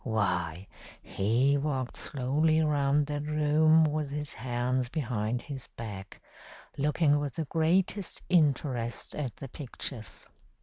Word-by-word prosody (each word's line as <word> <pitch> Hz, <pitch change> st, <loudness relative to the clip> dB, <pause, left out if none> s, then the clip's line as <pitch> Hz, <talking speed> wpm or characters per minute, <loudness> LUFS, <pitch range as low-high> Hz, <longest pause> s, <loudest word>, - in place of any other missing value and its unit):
Why, 90 Hz, -5 st, -1 dB, 0.4 s
he 125 Hz, +8 st, +2 dB
walked 135 Hz, -4 st, -2 dB
slowly 150 Hz, +4 st, +1 dB
round 145 Hz, -1 st, +2 dB
that 145 Hz, 0 st, -3 dB
room 155 Hz, +1 st, +4 dB
with 150 Hz, -1 st, 0 dB
his 145 Hz, +1 st, -3 dB
hands 125 Hz, +1 st, -1 dB
behind 120 Hz, -5 st, -2 dB
his 135 Hz, -4 st, -7 dB
back, 100 Hz, -4 st, -7 dB, 0.6 s
looking 145 Hz, +1 st, +2 dB
with 145 Hz, -3 st, -4 dB
the 160 Hz, -, -2 dB
greatest 175 Hz, +5 st, 0 dB
interest 140 Hz, -8 st, +1 dB
at 130 Hz, -7 st, -4 dB
the 135 Hz, -, -8 dB
pictures. 130 Hz, -4 st, -7 dB
140 Hz, 120 wpm, -29 LUFS, 120-150 Hz, 0.6 s, room